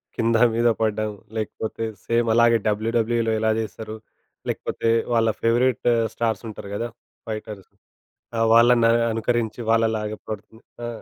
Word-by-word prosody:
కింద 115 0 +2 0.2
మీద 120 +1 +3
పడ్డం 110 -1 0 0.3
లేకపోతే 110 +1 -4 0.2
సేమ్ 115 0 +1
అలాగే 115 0 +5
డబ్ల్యూడబ్ల్యూఈలో 115 +2 +1
ఏలా 110 0 +2
చేస్తారు. 110 0 -5 0.5
లేకపోతే 115 - -2 0.2
వాళ్ళ 115 -1 +3
ఫేవరైట్ 120 +2 +2 0.2
స్టార్సుంటారు 110 -3 -3
గదా 120 +3 -3 0.4
ఫైటర్స్. 105 -3 -7 0.7
ఆ! - - 0
వాళ్ళని 115 0 +6
ఆహ్, 115 0 +3
అనుకరించి 115 0 -1
వాళ్ళలాగా 110 -2 +1
పడుతుం 110 +1 -7 0.3
ఆ - - -3
115 Hz, 120 wpm, -23 LUFS, 110-115 Hz, 0.7 s, వాళ్ళని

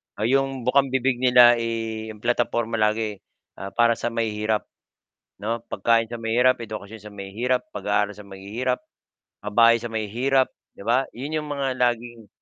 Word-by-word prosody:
ah, 105 - -4
'yong 135 +2 +1
bukambibig 130 0 +2
nila, 125 -1 +7
eh, 115 -1 -3
'yong 105 - -16
plataporma 120 -1 0
lagi. 105 -1 0 0.4
Ah, 100 +1 -5
para 120 0 +4
sa - - -1
mahihirap, 110 -1 -1 0.8
'no, 115 +3 -1
pagkain 115 +3 +2
sa 120 - -5
mahirap, 120 +3 +3
edukasyon 110 -1 -8
sa 105 - -9
mahihirap, 110 +6 -2
pag-aaral 105 0 0
sa 105 - -11
mahihirap, 105 +7 -3 0.7
pabahay 115 +3 +5
sa 120 - -5
mahihirap, 120 +5 +1 0.3
'di - - -10
ba, 125 +4 +2
'yon 145 +5 -3
'yong 150 - -8
mga 140 -2 -2
laging 120 -2 -1
115 Hz, 150 wpm, -24 LUFS, 110-125 Hz, 0.8 s, nila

